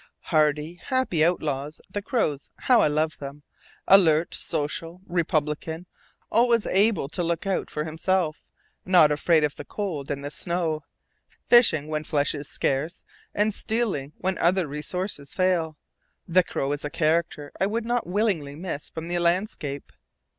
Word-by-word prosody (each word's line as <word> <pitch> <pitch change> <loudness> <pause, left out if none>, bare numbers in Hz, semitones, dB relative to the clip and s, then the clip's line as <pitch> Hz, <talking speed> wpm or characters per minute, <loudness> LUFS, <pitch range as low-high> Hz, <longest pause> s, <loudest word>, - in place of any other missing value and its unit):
Hardy, 155 +2 +1
happy 255 - +1
outlaws, 150 -4 -1
the 205 - -4
crows, 160 - -1
how 250 -2 +5
I - - +4
love 155 +1 0
them! 140 +1 -8 0.4
Alert, 170 -4 +5
social, 165 +4 -3
republican, 160 -1 -1 0.5
always 235 -1 +3
able 200 -5 +2
to 170 - -3
look 170 +1 -1
out 195 -1 -1
for 150 - -3
himself, 160 +1 -1 0.4
not 175 -5 +5
afraid 155 +2 +3
of 150 -1 0
the - - -6
cold 170 -10 -4
and 140 0 -3
the 145 - -4
snow, 165 -2 -2 0.6
fishing 195 - +5
when 155 0 -2
flesh 145 -2 +1
is 145 -1 -6
scarce, 145 +6 -2 0.3
and 210 +1 +2
stealing 205 - -2
when 185 -1 -2
other 180 +1 +3
resources 150 +1 -4
fail, 170 -4 +1 0.5
the 185 +1 +5
crow 135 -4 -2
is 145 0 -2
a 145 - -2
character 155 -2 0
I 190 - +4
would 225 +2 -2
not 240 -3 -1
willingly 180 -8 0
miss 160 -3 -5
from 160 0 -7
the 175 0 -1
landscape. 170 -5 -1
165 Hz, 150 wpm, -25 LUFS, 150-185 Hz, 0.6 s, how